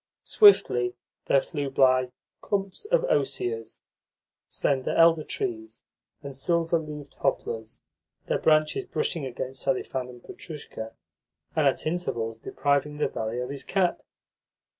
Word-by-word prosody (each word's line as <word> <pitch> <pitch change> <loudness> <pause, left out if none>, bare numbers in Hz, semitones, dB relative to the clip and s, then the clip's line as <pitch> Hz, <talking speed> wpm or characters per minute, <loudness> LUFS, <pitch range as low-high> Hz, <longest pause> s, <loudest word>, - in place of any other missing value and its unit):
Swiftly 120 - +5 0.3
there 135 - +5
flew 145 -3 -4
by 130 -1 +4 0.3
clumps 195 - -2
of - - +2
osiers, 115 -5 -1 0.7
slender 135 -2 0
elder 165 -1 +5
trees, 340 - -4 0.4
and 140 -1 -7
silver 170 +3 +1
leaved 150 -2 -8
poplars, 115 -3 -2 0.4
their - - 0
branches 155 -1 +2
brushing 155 -2 -2
against 130 +1 -5
Selifan 130 -1 -1
and 120 -1 -13
Petrushka, 140 -8 -8 0.6
and - - +4
at - - 0
intervals 120 -10 -2
depriving 140 +4 0
the 150 - +1
valet 115 +2 -3
of 125 - -4
his 140 -2 -5
cap. 185 +1 +1
140 Hz, 120 wpm, -27 LUFS, 125-165 Hz, 0.7 s, Swiftly